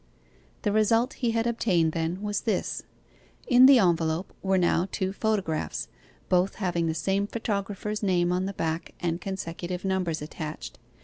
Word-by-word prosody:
The 210 Hz, -, +1 dB
result 225 Hz, +3 st, +3 dB
he 240 Hz, -, +2 dB
had 225 Hz, 0 st, 0 dB
obtained, 190 Hz, -9 st, +2 dB
then, 165 Hz, +4 st, -2 dB
was 205 Hz, -1 st, -1 dB
this: 215 Hz, -5 st, -1 dB, 0.6 s
in 250 Hz, 0 st, +7 dB
the 275 Hz, -1 st, +8 dB
envelope 170 Hz, -3 st, +1 dB
were 190 Hz, 0 st, +2 dB
now 175 Hz, 0 st, +2 dB
two 190 Hz, 0 st, -2 dB
photographs, 175 Hz, -, -1 dB, 0.4 s
both 185 Hz, +1 st, +2 dB
having 175 Hz, -4 st, -1 dB
the 160 Hz, -, -1 dB
same 195 Hz, +5 st, 0 dB
photographer's 210 Hz, -1 st, -3 dB
name 180 Hz, -3 st, +2 dB
on 180 Hz, +1 st, 0 dB
the 200 Hz, -, -4 dB
back 165 Hz, -2 st, -3 dB
and 170 Hz, 0 st, -2 dB
consecutive 180 Hz, -1 st, -5 dB
numbers 185 Hz, -4 st, 0 dB
attached. 155 Hz, 0 st, -7 dB
190 Hz, 150 wpm, -27 LUFS, 170-210 Hz, 0.6 s, the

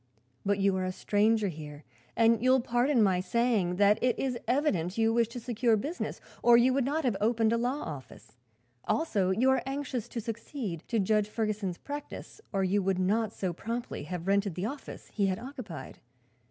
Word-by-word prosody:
"But 200 Hz, 0 st, +1 dB
you 195 Hz, -1 st, +2 dB
are 185 Hz, -, -1 dB
a 185 Hz, -, -1 dB
stranger 210 Hz, +3 st, +2 dB
here 150 Hz, -2 st, -9 dB, 0.3 s
and 230 Hz, -1 st, +4 dB
you 255 Hz, -, +3 dB
will 260 Hz, 0 st, +6 dB
pardon 245 Hz, +1 st, +2 dB
my 190 Hz, -3 st, +3 dB
saying 200 Hz, -2 st, +1 dB
that 205 Hz, +3 st, +4 dB
it 250 Hz, -2 st, +2 dB
is 265 Hz, -2 st, -1 dB
evident 225 Hz, -, +1 dB
you 225 Hz, 0 st, +3 dB
wish 235 Hz, -1 st, +3 dB
to 235 Hz, +2 st, -7 dB
secure 235 Hz, -1 st, +1 dB
business, 300 Hz, -, -4 dB, 0.2 s
or 240 Hz, 0 st, +7 dB
you 250 Hz, +2 st, +4 dB
would 270 Hz, -1 st, +1 dB
not 305 Hz, +4 st, 0 dB
have 245 Hz, -6 st, +1 dB
opened 225 Hz, 0 st, +2 dB
a -, -, +2 dB
law 250 Hz, +5 st, -1 dB
office. 130 Hz, -6 st, -9 dB, 0.5 s
Also 210 Hz, -, +1 dB
you 235 Hz, +8 st, +3 dB
are 265 Hz, -, +2 dB
anxious 270 Hz, -4 st, -3 dB
to 235 Hz, -, -5 dB
succeed 225 Hz, -, -5 dB
to 230 Hz, -, 0 dB
Judge 210 Hz, +1 st, +2 dB
Ferguson's 210 Hz, -5 st, -2 dB
practice, 290 Hz, +8 st, -8 dB
or 195 Hz, -2 st, 0 dB
you 195 Hz, +2 st, +2 dB
would 190 Hz, -1 st, 0 dB
not 210 Hz, +4 st, +1 dB
so 185 Hz, -5 st, -3 dB
promptly 230 Hz, -4 st, -5 dB
have 175 Hz, +1 st, -5 dB
rented 200 Hz, -2 st, +1 dB
the 185 Hz, -, -2 dB
office 275 Hz, +5 st, -7 dB
he 200 Hz, -3 st, +1 dB
had 185 Hz, -1 st, 0 dB
occupied. 245 Hz, -, -8 dB
220 Hz, 195 wpm, -29 LUFS, 190-245 Hz, 0.5 s, or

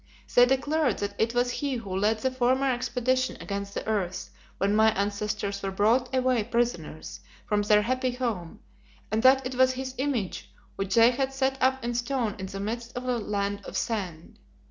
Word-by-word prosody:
They 245 Hz, 0 st, +7 dB
declared 270 Hz, 0 st, +1 dB
that 200 Hz, 0 st, -3 dB
it 230 Hz, +2 st, +1 dB
was 245 Hz, 0 st, +2 dB
he 280 Hz, 0 st, -2 dB
who 200 Hz, -6 st, -5 dB
led 210 Hz, +3 st, +2 dB
the 260 Hz, -, +1 dB
former 260 Hz, +2 st, +2 dB
expedition 255 Hz, +1 st, 0 dB
against 200 Hz, 0 st, -5 dB
the -, -, -3 dB
earth 185 Hz, -4 st, -2 dB, 0.3 s
when 200 Hz, +1 st, +1 dB
my 220 Hz, +1 st, +5 dB
ancestors 200 Hz, 0 st, -2 dB
were 195 Hz, -, -2 dB
brought 225 Hz, +6 st, +2 dB
away 255 Hz, -3 st, +2 dB
prisoners 235 Hz, -9 st, -2 dB, 0.3 s
from 210 Hz, 0 st, +1 dB
their 210 Hz, 0 st, +4 dB
happy 255 Hz, +3 st, 0 dB
home, 225 Hz, -10 st, -4 dB, 0.5 s
and 220 Hz, +1 st, +1 dB
that 260 Hz, +1 st, +5 dB
it 255 Hz, -, -3 dB
was 255 Hz, 0 st, +4 dB
his 260 Hz, 0 st, -5 dB
image 260 Hz, -9 st, -2 dB, 0.2 s
which 195 Hz, -1 st, -2 dB
they 230 Hz, +1 st, +7 dB
had 265 Hz, +2 st, -1 dB
set 270 Hz, 0 st, -1 dB
up 260 Hz, 0 st, +2 dB
in 240 Hz, -, -1 dB
stone 240 Hz, -3 st, -1 dB
in 190 Hz, -, -4 dB
the 195 Hz, +1 st, -6 dB
midst 235 Hz, +4 st, -4 dB
of 245 Hz, -, -4 dB
the 250 Hz, -2 st, 0 dB
Land 200 Hz, -1 st, -2 dB
of -, -, -5 dB
Sand. 185 Hz, -8 st, -4 dB
235 Hz, 190 wpm, -27 LUFS, 205-255 Hz, 0.5 s, They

